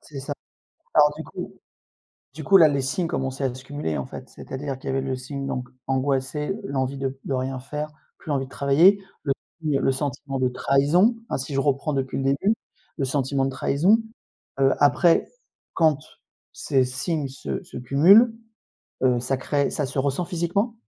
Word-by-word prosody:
C'est 140 Hz, -3 st, -9 dB
ça. 145 Hz, +1 st, -4 dB, 0.6 s
Alors 150 Hz, -1 st, +5 dB
du 160 Hz, -, -5 dB
coup -, -, -8 dB, 0.8 s
du 155 Hz, -, -7 dB
coup 195 Hz, +4 st, +7 dB
là, 160 Hz, -3 st, +8 dB
les 140 Hz, -2 st, 0 dB
signes 165 Hz, +6 st, -1 dB
commençaient 135 Hz, +1 st, -2 dB
à 130 Hz, -2 st, -1 dB
se 130 Hz, 0 st, -11 dB
cumuler, 145 Hz, -, -3 dB
en -, -, -2 dB
fait, -, -, -9 dB
c'est-à-dire 135 Hz, 0 st, -6 dB
qu'il -, -, -7 dB
y -, -, 0 dB
avait 135 Hz, -, +1 dB
le 130 Hz, -1 st, -2 dB
signe 135 Hz, +2 st, -5 dB
donc, 125 Hz, -2 st, -3 dB, 0.2 s
angoissée, 135 Hz, +4 st, 0 dB
l'envie 135 Hz, -3 st, -2 dB
de 135 Hz, 0 st, -3 dB
de 135 Hz, -, -2 dB
rien 130 Hz, 0 st, -2 dB
faire, 150 Hz, +3 st, -5 dB, 0.3 s
plus 155 Hz, -, -9 dB
envie 135 Hz, -2 st, 0 dB
de -, -, -19 dB
travailler, 160 Hz, +10 st, +4 dB, 0.2 s
le 140 Hz, -, +2 dB, 0.3 s
aussi, 150 Hz, -3 st, +1 dB
heu, -, -, -3 dB
le 135 Hz, -, +2 dB
sentiment 135 Hz, 0 st, -3 dB
de 130 Hz, -1 st, +2 dB
trahison. 150 Hz, -, +3 dB
Hein, -, -, -1 dB
si 135 Hz, +1 st, -5 dB
je 135 Hz, -, +2 dB
reprends 140 Hz, +1 st, 0 dB
depuis 135 Hz, -1 st, -2 dB
le 135 Hz, -, -2 dB
début? 140 Hz, +11 st, +2 dB, 0.4 s
Le 135 Hz, -, 0 dB
sentiment 135 Hz, 0 st, 0 dB
de -, -, -1 dB
trahison. 155 Hz, +10 st, +3 dB, 0.6 s
Heu, 135 Hz, 0 st, +5 dB
après, 165 Hz, +4 st, +4 dB, 0.5 s
quand 155 Hz, -4 st, +3 dB, 0.5 s
ces 130 Hz, -2 st, +1 dB
signes 135 Hz, +4 st, -2 dB
se 70 Hz, -, -5 dB
se -, -, -12 dB
cumulent, 190 Hz, -, +6 dB, 0.7 s
heu, 125 Hz, -2 st, +3 dB
ça 130 Hz, +2 st, -1 dB
crée 140 Hz, +2 st, 0 dB
ça 145 Hz, -, -1 dB
se 135 Hz, +1 st, -5 dB
ressent 140 Hz, +6 st, 0 dB
physiquement? 180 Hz, +6 st, -1 dB
140 Hz, 190 wpm, -24 LUFS, 135-150 Hz, 0.8 s, là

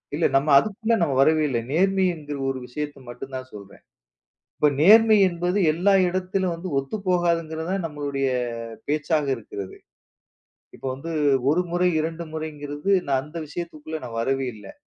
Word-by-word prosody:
இல்லை 160 Hz, -, +2 dB
நம்ம 140 Hz, +3 st, +2 dB
அதுக்குள்ளே 220 Hz, -, +1 dB
நம்ம 155 Hz, -5 st, +1 dB
வரவே 155 Hz, +2 st, +4 dB
இல்லை. 120 Hz, -3 st, 0 dB
நேர்மை 190 Hz, +3 st, +2 dB
என்கிற 150 Hz, -2 st, -7 dB
ஒரு 130 Hz, -, -3 dB
விஷயத்தை 145 Hz, +2 st, -5 dB
மட்டும்தான் 130 Hz, +1 st, -7 dB
சொல்றேன். 100 Hz, -2 st, -12 dB, 0.8 s
இப்போ 150 Hz, -, +3 dB
நேர்மை 220 Hz, +5 st, +7 dB
என்பது 175 Hz, +2 st, -1 dB
எல்லா 185 Hz, +5 st, +2 dB
இடத்திலும் 185 Hz, 0 st, -1 dB
வந்து 170 Hz, +3 st, -6 dB
ஒத்துப்போகாது 175 Hz, +1 st, 0 dB
என்கிறதுதான் 165 Hz, +4 st, -4 dB
நம்மளுடைய 145 Hz, -3 st, -2 dB, 0.6 s
பேச்சாக 150 Hz, 0 st, 0 dB
இருக்கிறது. 100 Hz, -3 st, -8 dB, 1.0 s
இப்போ -, -, -8 dB
வந்து 165 Hz, +5 st, -7 dB, 0.4 s
1 175 Hz, +4 st, +2 dB
முறை 175 Hz, +1 st, +2 dB
2 165 Hz, +2 st, -3 dB
முறை 160 Hz, 0 st, -3 dB
என்கிறது. 145 Hz, +4 st, -4 dB, 0.2 s
நான் 135 Hz, -1 st, +1 dB
அந்த 155 Hz, +3 st, -8 dB
விஷயத்துக்குள்ளே 160 Hz, -1 st, -6 dB
நான் 115 Hz, -2 st, -6 dB
வரவே 135 Hz, +2 st, 0 dB
இல்லை. 105 Hz, -, -11 dB
155 Hz, 145 wpm, -24 LUFS, 140-180 Hz, 1.0 s, நேர்மை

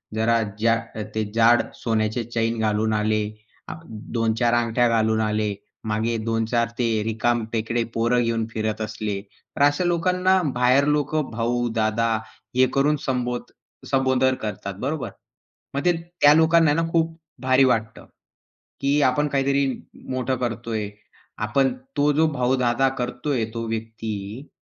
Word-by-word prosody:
जरा 115 Hz, +1 st, +2 dB, 0.2 s
जा 115 Hz, +1 st, +4 dB, 0.4 s
ते 110 Hz, -, +1 dB
जाड 115 Hz, +1 st, +5 dB
सोन्याचे 110 Hz, 0 st, -1 dB
चैन 115 Hz, 0 st, -1 dB
घालून 110 Hz, 0 st, +1 dB
आले, 105 Hz, 0 st, +1 dB, 0.4 s
अ, -, -, -5 dB
2-4 115 Hz, +2 st, -1 dB
अंगठ्या 120 Hz, +1 st, +2 dB
घालून 110 Hz, -1 st, +2 dB
आले, 105 Hz, -1 st, 0 dB, 0.3 s
मागे 110 Hz, +2 st, 0 dB
2-4 115 Hz, +1 st, 0 dB
ते 120 Hz, -, +2 dB, 0.2 s
रिकामटेकडे 115 Hz, +1 st, 0 dB
पोर 115 Hz, +2 st, +2 dB
घेऊन 115 Hz, -2 st, 0 dB
फिरत 110 Hz, 0 st, -2 dB
असले, 105 Hz, -2 st, -3 dB, 0.4 s
तर -, -, -2 dB
अशा 145 Hz, +5 st, +3 dB
लोकांना 180 Hz, +2 st, +2 dB
बाहेर 125 Hz, +3 st, +4 dB
लोक 145 Hz, +1 st, -2 dB, 0.2 s
भाऊ, 120 Hz, +1 st, 0 dB
दादा 110 Hz, +1 st, +1 dB, 0.5 s
हे 130 Hz, 0 st, +5 dB
करून 145 Hz, +2 st, +3 dB
संबोध 125 Hz, -2 st, -2 dB, 0.4 s
संबोधन 130 Hz, -1 st, +3 dB
करतात. 100 Hz, -2 st, -4 dB
बरोबर? 135 Hz, -4 st, -2 dB, 0.7 s
मग 140 Hz, -, 0 dB
ते 175 Hz, -, +6 dB, 0.3 s
त्या 145 Hz, 0 st, +8 dB
लोकांना 160 Hz, -1 st, +5 dB
ना 165 Hz, -, +1 dB
खूप 165 Hz, -1 st, +1 dB, 0.2 s
भारी 130 Hz, +1 st, +4 dB
वाटतं 115 Hz, -3 st, -1 dB, 0.8 s
की 140 Hz, +2 st, +2 dB
आपण 150 Hz, +3 st, +1 dB
काहीतरी 140 Hz, 0 st, +1 dB, 0.4 s
मोठं 130 Hz, 0 st, -1 dB
करतोय. 115 Hz, -3 st, -3 dB, 0.5 s
आपण 125 Hz, +6 st, +1 dB, 0.2 s
तो 145 Hz, +1 st, +4 dB
जो 160 Hz, +2 st, +3 dB
भाऊ, 125 Hz, -1 st, +1 dB
दादा 125 Hz, +2 st, +2 dB
करतोय 125 Hz, 0 st, -1 dB
तो 115 Hz, -1 st, -3 dB
व्यक्ती, 110 Hz, +1 st, -5 dB
120 Hz, 135 wpm, -23 LUFS, 110-135 Hz, 0.8 s, त्या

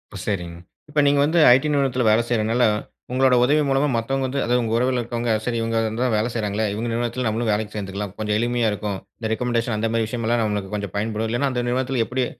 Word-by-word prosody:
ஓ! -, -, -5 dB
சரிங். 90 Hz, -5 st, -3 dB, 0.3 s
இப்ப 150 Hz, 0 st, 0 dB
நீங்க 140 Hz, 0 st, +3 dB
வந்து 160 Hz, +4 st, +2 dB
ஐடி 130 Hz, +4 st, +4 dB
நிறுவனத்துல 135 Hz, -3 st, +1 dB
வேல 110 Hz, +2 st, +4 dB
செய்றனால, 115 Hz, +1 st, +1 dB, 0.5 s
உங்களோட 130 Hz, 0 st, +3 dB
உதவி 145 Hz, +4 st, +3 dB
மூலமா 135 Hz, +2 st, +2 dB
மத்தவங்க 135 Hz, +4 st, -1 dB
வந்து 135 Hz, +2 st, -2 dB
அதாவது 125 Hz, +1 st, +1 dB
உங்க 110 Hz, -1 st, -2 dB
உறவுல 125 Hz, +1 st, +1 dB
இருக்கவங்க, 120 Hz, 0 st, -2 dB
சரி 120 Hz, -1 st, -1 dB
இவுங்க 115 Hz, 0 st, -1 dB, 0.2 s
தான் 125 Hz, -2 st, +1 dB
வேல 110 Hz, +3 st, 0 dB
செய்றாங்களே! 110 Hz, -1 st, -1 dB
இவுங்க 115 Hz, +3 st, -3 dB
நிறுவனத்துல 120 Hz, +2 st, -2 dB
நம்மளும் 110 Hz, +1 st, -1 dB
வேலைக்கு 105 Hz, 0 st, -2 dB
சேர்ந்துக்கலாம். 100 Hz, -1 st, -5 dB
கொஞ்சம் 105 Hz, -1 st, 0 dB
எளிமையா 120 Hz, -1 st, +1 dB
இருக்கும். 105 Hz, -1 st, -3 dB, 0.2 s
இந்த 110 Hz, -2 st, -3 dB
ரெக்கமெண்டேஷன் 120 Hz, -1 st, -1 dB
அந்தமாரி 115 Hz, +1 st, 0 dB
விஷயம்லாம் 115 Hz, 0 st, -1 dB
நம்மளுக்கு 105 Hz, -2 st, -3 dB
கொஞ்சம் 100 Hz, -1 st, -5 dB
பயன்படும். 110 Hz, +1 st, -2 dB
இல்லன்னா, 120 Hz, +5 st, 0 dB
அந்த 125 Hz, -1 st, -1 dB
நிறுவனத்துல 125 Hz, -1 st, 0 dB
எப்பிடி 130 Hz, +1 st, -1 dB
115 Hz, 205 wpm, -22 LUFS, 110-125 Hz, 0.5 s, ஐடி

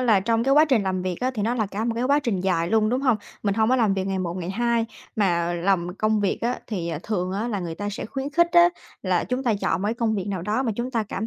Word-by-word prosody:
là 225 Hz, -6 st, +4 dB
trong 230 Hz, +3 st, +1 dB
cái 275 Hz, +1 st, +4 dB
quá 305 Hz, +1 st, +7 dB
trình 260 Hz, -8 st, +2 dB
làm 185 Hz, -1 st, -1 dB
việc 185 Hz, -1 st, -2 dB
á, 255 Hz, -, +1 dB
thì 210 Hz, -, -2 dB
nó 235 Hz, +3 st, 0 dB
là 220 Hz, -3 st, 0 dB
cả 205 Hz, +3 st, -4 dB
một 235 Hz, -, -1 dB
cái 235 Hz, +2 st, -1 dB
quá 285 Hz, +2 st, +4 dB
trình 230 Hz, -10 st, -1 dB
dài 175 Hz, -3 st, 0 dB
luôn, 220 Hz, 0 st, +3 dB
đúng 250 Hz, +3 st, 0 dB
hông? 255 Hz, -5 st, +3 dB, 0.3 s
Mình 200 Hz, -2 st, +1 dB
hông 220 Hz, 0 st, +2 dB
có 260 Hz, -, +4 dB
làm 220 Hz, -5 st, +2 dB
việc 190 Hz, 0 st, -2 dB
ngày 190 Hz, -1 st, -1 dB
một 175 Hz, -1 st, -3 dB
ngày 180 Hz, -1 st, -4 dB
hai, 235 Hz, +2 st, +1 dB, 0.3 s
mà 175 Hz, -4 st, +1 dB
làm 175 Hz, 0 st, 0 dB
công 215 Hz, +1 st, +1 dB
việc 200 Hz, -, 0 dB
á 245 Hz, +2 st, -1 dB
thì, 180 Hz, -7 st, -3 dB
à, 165 Hz, -3 st, -3 dB
thường 185 Hz, -4 st, -2 dB
á 215 Hz, +5 st, -2 dB
là 205 Hz, -4 st, -2 dB
người 170 Hz, -2 st, -4 dB
ta 205 Hz, +4 st, -4 dB
sẽ 205 Hz, -, -5 dB
khuyến 270 Hz, +3 st, -4 dB
khích 345 Hz, +3 st, +3 dB
á 345 Hz, 0 st, +7 dB, 0.3 s
là 185 Hz, -3 st, +1 dB
chúng 255 Hz, +1 st, -2 dB
ta 235 Hz, -4 st, +2 dB
chọn 165 Hz, +3 st, 0 dB
một -, -, 0 dB
cái 220 Hz, -, 0 dB
công 230 Hz, -2 st, 0 dB
việc 195 Hz, -2 st, -3 dB
nào 190 Hz, -4 st, -3 dB
đó 215 Hz, +7 st, 0 dB
mà 230 Hz, -, -1 dB
chúng 245 Hz, +2 st, -3 dB
ta 230 Hz, -3 st, 0 dB
cảm 210 Hz, +1 st, -4 dB
215 Hz, 315 wpm, -24 LUFS, 190-240 Hz, 0.3 s, quá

